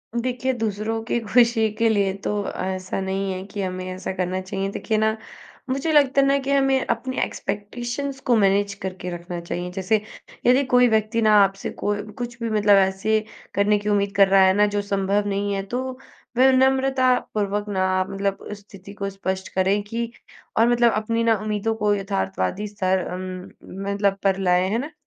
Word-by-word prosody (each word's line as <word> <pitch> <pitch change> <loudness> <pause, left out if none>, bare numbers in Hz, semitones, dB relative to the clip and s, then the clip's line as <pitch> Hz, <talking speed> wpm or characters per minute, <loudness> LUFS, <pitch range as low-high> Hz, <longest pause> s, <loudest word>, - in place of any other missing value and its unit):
देखिए, 250 +2 -1
दूसरों 225 -1 -2
की 235 +1 -1
खुशी 230 0 +3
के 230 - +4
लिए 200 -3 +1
तो - - -1 0.2
ऐसा 185 0 -3
नहीं 190 0 -2
है 185 - -5
कि 200 0 -6
हमें 185 -1 -4
ऐसा 185 +1 -5
करना 185 0 -1
चाहिए, 195 +1 -3
देखिए 220 +1 -2
ना, 220 0 +1 0.5
मुझे 275 +5 -1
लगता 280 -2 +4
है - - +3
ना 275 0 +3
कि 275 0 -3
हमें 270 -1 +2
अपनी 260 0 -2
एक्सपेक्टेशंस 240 +6 -4
को 245 - +5
मैनेज 200 -1 +2
करके 185 -2 -6
रखना 175 0 -6
चाहिए। 175 +1 -5
जैसे, 195 +3 0 0.4
यदि 255 +3 +5
कोई 250 -1 +5
व्यक्ति 220 +1 +1
ना 215 -1 +4
आपसे 195 0 -2
कोई 205 0 0
कुछ 240 +2 -6
भी 230 - -1
मतलब 210 -1 +4
ऐसे 215 +3 0 0.4
करने 205 +1 +3
की 210 +1 -3
उम्मीद 200 -1 +1
कर 200 -1 +6
रहा 190 0 +5
है 190 0 +5
ना, 205 +1 +4
जो 205 0 -1
संभव 200 0 0
नहीं 200 0 -1
है, 195 0 -2
तो 255 +5 -4 0.4
विनम्रतापूर्वक 260 -5 +2
ना 185 -1 +1
मतलब 195 0 -3
स्थिति 200 -1 -12
को 200 -1 -4
स्पष्ट 190 -1 -4
करें 190 +2 +2
कि 230 +2 -4 0.5
और 225 +1 +5
मतलब 240 -1 +4
अपनी 230 +2 0
ना 225 -1 +4
उम्मीदों 215 +1 -1
को 210 -2 +1
यथार्थवादी 195 - -2
स्तर 190 -2 0
अम, 185 0 -6 0.4
मतलब 200 -1 +1
पर 195 -1 +2
लाएँ, 180 0 +2
है 215 - 0
ना? 285 +6 -4
205 Hz, 180 wpm, -23 LUFS, 195-235 Hz, 0.5 s, कर